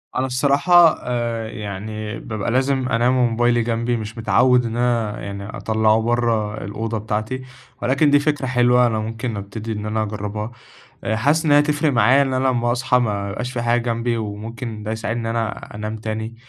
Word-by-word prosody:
أنا 130 - +1
الصراحة 145 +6 +4
آآ، 120 -2 -2
يعني 105 +1 -6
بابقى 110 -1 -4
لازم 130 0 +1
أنام 125 +1 +2
وموبايلي 120 0 +2
جنبي، 115 +1 -1
مش 110 +1 -7
متعوِّد 125 +2 +3
إن 115 0 -3
أنا 120 -3 0
يعني 100 0 -6
أطلَّعه 110 0 +1
برّه 115 -2 0
الأوضة 110 +3 -3
بتاعتي، 110 +4 -3 0.4
ولكن 140 +4 +3
دي 145 0 +5
فكرة 145 -2 0
حلوة 125 -1 +4
أنا 110 -2 -1
ممكن 115 +1 -4
ابتدي 105 +3 -6
إن 105 0 -5
أنا 110 +1 -1
أجرَّبها 105 +1 -4 0.5
آآ 110 - 0
حاسس 145 +8 +2
إن 155 - +1
هي 145 - +7
هتفرق 150 0 +2
معايا 125 +4 +5
إن 135 -1 -1
أنا 130 +1 +1
لمَّا 120 -2 +1
أصحى 125 +1 +2
ما 100 -4 -1
يبقاش 125 +5 -4
في 120 -2 -3
حاجة 120 +1 +2
جنبي، 115 0 -1
وممكن 110 +1 -6
ده 105 - -4
يساعدني 110 +1 -3
إن 115 - -2
أنا 115 -2 -4
أنام 105 +1 -4
تاني، 110 +1 -5
115 Hz, 180 wpm, -21 LUFS, 110-125 Hz, 0.5 s, هي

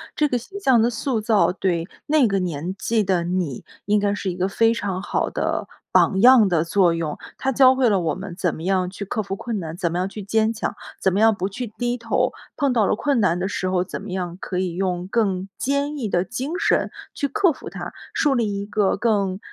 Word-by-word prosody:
这 300 - +2
个 250 - 0
形 385 - -8
象 260 - +4
的 235 +2 +3
塑 235 +1 -1
造 215 -4 +3
对 180 -2 -1 0.2
那 295 -5 +4
个 195 -1 0
年 175 0 -3
纪 225 0 +1
的 185 -3 +1
你 175 -7 -2 0.2
应 210 +1 +3
该 200 0 +1
是 200 -2 -3
一 175 - -3
个 185 +1 0
非 225 +3 +2
常 195 -4 -3
好 - - -1
的 - - -2 0.2
榜 190 0 +4
样 245 -3 +8
的 170 -4 +2
作 175 0 +3
用， 165 -3 -3 0.2
它 270 - 0
教 260 +1 +6
会 260 -3 +3
了 195 -3 +3
我 160 -3 0
们 185 -1 -7
怎 180 -4 0
么 160 - -8
样 185 0 +1
去 200 - -6
克 215 +2 -2
服 195 0 -4
困 230 +2 -4
难， 160 -2 -6
怎 170 -2 -1
么 175 - -2
样 185 +1 0
去 205 +2 -8
坚 220 +3 +1
强， 220 - -3 0.3
怎 190 - +3
么 195 - 0
样 225 0 +5
不 195 0 -3
去 245 +5 -5
低 240 +3 -3
头。 230 -1 0 0.3
碰 280 -2 +2
到 220 -4 +3
了 - - +2
困 280 +1 +1
难 180 -4 +2
的 190 - -1
时 190 -2 -2
候， 185 -1 +1
怎 - - -6
么 200 - -7
样 180 -1 -3
可 180 -1 -3
以 180 -2 -1
用 180 -1 -2
更 195 -3 0
坚 280 +2 -1
毅 245 -6 -2
的 175 -2 +1
精 265 - -4
神 - - +1 0.2
去 285 - -1
克 380 +1 +3
服 - - -9
它， - - -6 0.2
树 290 -3 +2
立 210 -5 0
一 200 - -4
个 210 -2 +1
更 200 -3 0
200 Hz, 260 characters per minute, -22 LUFS, 185-235 Hz, 0.3 s, 样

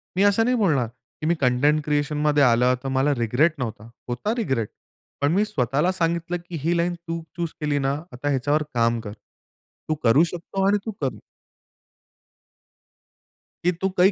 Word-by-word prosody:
मी 190 - +3
असं 205 +2 +4
नाही 250 +1 +2
बोलणार, 150 - +2
की 130 +6 -12
मी 170 - +3
कंटेंट 145 +4 +3
क्रिएशनमध्ये 150 0 +2
आलं 125 0 +4
तर - - -3
मला 140 +2 +3
रिग्रेट 125 +8 +2
नव्हता. 115 -2 -5 0.2
होता 125 - -2
रिग्रेट, 135 - -1 0.5
पण 145 +1 +3
मी 205 +3 +3
स्वतःला 150 - +1
सांगितलं 170 -1 -1
की 175 - -5
ही 170 +2 +2
लाईन 175 +1 +1
तू 170 -1 -5 0.2
चूज 170 -1 -1
केली 150 -1 +1
ना, 135 0 +1 0.2
आता 130 +4 -3
ह्याच्यावर 145 +3 +1
काम 115 -1 +2
कर. 105 -2 -7 0.8
तू 155 - +2
करू 125 +7 +6
शकतो 175 +3 -2
आणि 205 +1 +4
तू 220 - -2
कर. 135 -2 -2 2.5
की 180 - +4
तू 190 - +2
काही 185 +3 +6
150 Hz, 165 wpm, -24 LUFS, 125-175 Hz, 2.5 s, करू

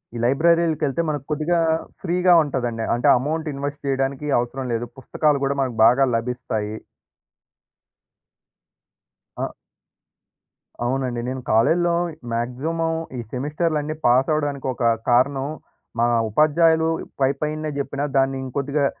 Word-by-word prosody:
ఈ - - -3
లైబ్రరీలకెళ్తే 160 +1 +2
మనకు 145 -3 -3
కొద్దిగా, 155 +3 +1 0.4
ఫ్రీగా 180 0 +3
ఉంటదండి. 120 -5 -2
అంటే, 120 - +1
అమౌంటిన్వెస్ట్ 145 -1 -3
చేయడానికి 135 +1 -1
అవసరం 130 +2 -3
లేదు. 115 +1 -1
పుస్తకాలు 150 +2 +1
కూడా 140 +1 0
మనకు 130 -3 -2
బాగా 130 +4 +5
లభిస్తాయి. 115 -3 -3 2.6
ఆ! - - -1 1.4
అవునండి. 125 -2 -1
నేను 130 0 -4
కాలేజీలో 170 +11 +3 0.4
మాక్సిమమ్ 130 +8 -2 0.4
ఈ - - -4
సెమిస్టర్లన్నీ 150 +3 -1
పాస్ 125 +4 +4
అవ్వడానికి 145 -3 -2
ఒక 120 - -5 0.3
కారణం, 135 +3 +2 0.5
మా 120 - +4 0.2
ఉపాధ్యాయులు 160 +5 +3 0.3
పైపైనే 150 +3 0
చెప్పినా, 140 0 -3
దాన్ని 135 0 +2
ఇంకొద్దిగా 140 +2 -1
140 Hz, 105 wpm, -22 LUFS, 125-155 Hz, 2.6 s, బాగా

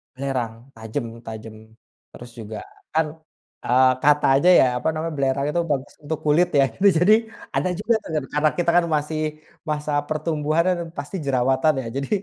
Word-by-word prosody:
Belerang, 130 -4 -2 0.2
tajem 110 +4 -4 0.2
tajem. 110 0 -8 0.6
Terus 120 - -11
juga 110 -1 -7 0.4
kan, 160 +1 +2 0.6
eee, 130 +1 +5
katanya 145 +2 +4 0.3
apa 125 - -3
namanya, 160 +1 -3
belerang 140 0 0
itu 170 +3 0
bagus 135 -1 -2
untuk 150 +1 -3
kulit 155 +4 +4
ya, - - +6
gitu. 200 - +2
Jadi, 200 +4 +6 0.4
ada 185 - +1
juga 210 +6 0
tuh - - -10 0.2
karena 150 +1 +3
kita 175 -1 +1
kan 175 - +4
masih 150 +1 -2 0.5
masa 150 0 -2 0.2
pertumbuhan 155 +1 0
kan 180 - +1 0.2
pasti 145 +6 -6
jerawatan 130 +3 +2
ya, - - -9
jadi, 135 0 -3
145 Hz, 155 wpm, -22 LUFS, 130-160 Hz, 0.6 s, ya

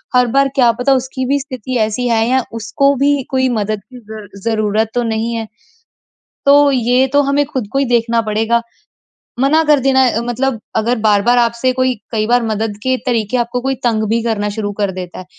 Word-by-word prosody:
हर 250 0 +4
बार 275 0 +4
क्या 245 -4 +4
पता 270 +2 +3
उसकी 260 0 -2
भी 280 +2 +1
स्थिति 255 -2 -5
ऐसी 220 +3 -1
है 225 -1 +1
या 260 +1 +2 0.2
उसको 275 +6 +1
भी 280 +1 +2
कोई 260 -1 +1
मदद 215 0 -2
की 250 - -10
ज़र 215 -1 -9 0.2
ज़रूरत 220 -1 0
तो 245 - +1
नहीं 225 0 -2
है। 225 -1 -3 1.0
तो 285 0 +6
ये 250 +1 +2
तो 285 - +4
हमें 280 +1 +1
खुद 260 -7 -4
को 270 - 0
ही 275 - +2
देखना 230 0 +2
पड़ेगा। 225 +2 0 0.8
मना 305 +5 +3
कर 300 -2 +3
देना 265 0 +3
अ, 230 - -1
मतलब 245 +1 -2 0.2
अगर 235 +3 +1
बार-बार 215 +4 +3
आपसे 235 +2 +1
कोई 255 0 +1 0.2
कई 215 -2 0
बार 245 0 +2
मदद 220 -1 -2
के 260 0 +1
तरीके 230 -1 0
आपको 240 +1 -2
कोई 270 +1 -1
तंग 225 -3 +1
भी 230 +1 +1
करना 210 -3 -1
शुरू 205 -2 -2
कर 200 -1 0
देता 180 -1 -7
है। 185 - -9
240 Hz, 205 wpm, -16 LUFS, 220-260 Hz, 1.0 s, तो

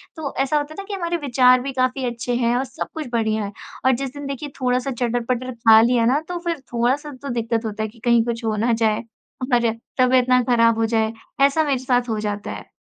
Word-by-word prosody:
तो 300 -4 -5
ऐसा 270 +3 +1
होता 295 +1 -3
है 395 - -6
ना - - -9
कि 410 - -5
हमारे 345 -2 -2
विचार 255 0 +5
भी 270 +2 -4
काफ़ी 255 0 0
अच्छे 240 0 -2
हैं 240 0 +1
और 255 - 0
सब 260 - -6
कुछ 310 -3 -5
बढ़िया 220 -2 0
है। 200 - -5 0.3
और 260 - +6
जिस 270 +1 -3
दिन 285 0 -7
देखिए 275 +1 -5
थोड़ा-सा 250 +1 0
चटर-पटर 245 +1 -2
खा 225 -1 +6
लिया 235 0 +3
ना 260 +5 +3
तो 355 -1 -4
फिर 335 -3 -1
थोड़ा-सा 260 +5 0
तो 280 - -6
दिक्कत 230 -1 -1
होता 215 0 -3
है 220 - -3
कि 230 +2 -19
कहीं 235 -1 +4
कुछ 235 0 -3
हो 220 -1 0
ना 240 - +3
जाए 215 +1 +1 0.5
और 235 -2 +3 0.3
तबीयत 255 0 +4
ना 250 0 +5
ख़राब 230 -2 +4
हो 225 - +2
जाए, 220 -1 0 0.3
ऐसा 280 +3 +4
मेरे 280 -3 +1
साथ 245 -1 +1
हो 220 - -1
जाता 210 -1 -3
है। - - -9
245 Hz, 240 wpm, -21 LUFS, 230-270 Hz, 0.5 s, और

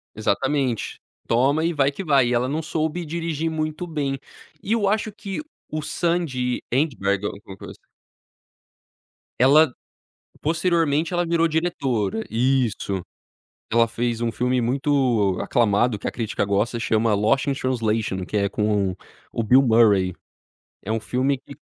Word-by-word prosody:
Exatamente. 130 +3 -1 0.3
"Toma 135 +7 +2
e 170 - +1
vai 140 -3 +2
que 145 +7 -7
vai", 140 -6 +4
e 125 - +1
ela 125 +2 +1
não 155 +3 -2
soube 160 +2 -2
dirigir 165 0 -2
muito 155 +2 -3
bem. 140 -4 -2 0.4
E 210 - -2
eu 215 -4 +2
acho 215 +1 0
que 200 +1 -6 0.3
o 155 - -2
Sandy 150 -7 -1
Endberg, 105 -8 0
a - - +1
alguma 100 -1 -11
coisa - - -10 1.6
Ela 140 +2 +6 0.7
posteriormente, 165 0 +1
ela 175 0 +1
virou 165 0 +2
diretora 135 - -1
isso. 115 -5 0 0.7
Ela 115 0 +4
fez 115 0 -2
um 115 -1 0
filme 125 +2 0
muito 125 -6 +1
aclamado, 115 0 +2
que - - -5
a - - -1
crítica 110 -3 -2
gosta, 100 +4 0
chama 110 -1 +1
Lost 110 +8 +2
in 140 - +2
Translation, 115 -7 -1
que 105 - -6
é 100 -1 +1
com 105 -3 0 0.4
o 115 - -2
Bill 130 +5 +6
Murray. 110 -6 +4 0.7
É 105 - -6
um 115 - +1
filme 130 +4 0
que 140 +1 -13
130 Hz, 145 wpm, -23 LUFS, 110-155 Hz, 1.6 s, Ela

